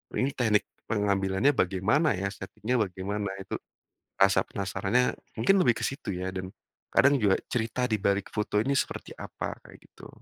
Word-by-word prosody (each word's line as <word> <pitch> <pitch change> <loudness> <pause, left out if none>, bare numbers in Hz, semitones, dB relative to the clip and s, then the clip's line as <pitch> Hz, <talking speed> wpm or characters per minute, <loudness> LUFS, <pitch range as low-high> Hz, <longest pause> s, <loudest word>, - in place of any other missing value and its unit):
"Ini 135 +2 +1
teknik 110 -6 +2 0.2
pengambilannya 100 +2 +2
bagaimana 110 - +2
ya? 100 +2 -2
Setting-nya 105 +5 -3
bagaimana?" 100 +1 -2 0.2
Itu - - -5 0.6
rasa 95 -1 +5
penasarannya 100 +5 0 0.2
mungkin 195 - +5
lebih 120 -2 +3
ke - - -1
situ 135 -7 -5
ya, 90 +1 -3
dan 95 0 -5 0.4
kadang 140 +1 +5
juga 100 -3 +3
cerita 125 +1 -1
di 110 - +2
balik 100 0 +1
foto 105 -1 0
ini 140 +4 +1
seperti - - -3
apa? - - -5
Kayak - - -14
gitu. - - -14
105 Hz, 160 wpm, -28 LUFS, 95-125 Hz, 0.6 s, rasa